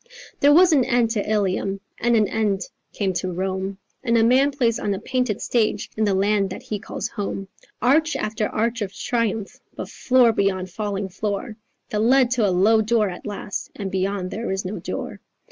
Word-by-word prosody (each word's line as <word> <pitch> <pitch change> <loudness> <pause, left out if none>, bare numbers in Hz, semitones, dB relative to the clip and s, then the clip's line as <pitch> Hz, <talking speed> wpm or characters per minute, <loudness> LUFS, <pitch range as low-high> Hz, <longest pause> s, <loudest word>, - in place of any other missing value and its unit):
"There 285 - +5
was 350 +4 +7
an 275 -4 +5
end 240 -1 +2
to 210 -2 -1
Ilium; 195 -1 0 0.2
and 240 0 +2
an 215 -2 +3
end 210 -3 0 0.3
came 195 -3 -1
to 185 +1 -2
Rome; 190 +2 -3 0.3
And 235 -2 +2
a 225 - +4
man 260 +4 +4
plays 245 -5 0
on 200 -1 -1
a - - -5
painted 250 -2 -1
stage 215 -3 0
in 220 - +1
the 200 -2 +2
land 200 0 +2
that - - -7
he 210 - -4
calls 210 0 -5
home; 195 -2 -5 0.3
Arch 310 +6 +3
after 215 0 -1
arch 230 +2 -1
of 200 -2 -2
triumph, 225 -2 -2 0.2
but - - -6
floor 255 -2 +4
beyond 190 -3 0
falling 200 -1 -3
floor, 210 +4 -3 0.4
That 210 - 0
lead 250 +2 +4
to 235 -5 +2
a - - +2
low 205 +5 +4
door 220 -1 +2
at 180 - -9
last; 205 -1 -5
and 195 -3 -5
beyond 190 0 -1
there 230 +3 -4
is 190 0 -2
no 190 +3 -4
door." - - -5
210 Hz, 195 wpm, -23 LUFS, 195-235 Hz, 0.4 s, was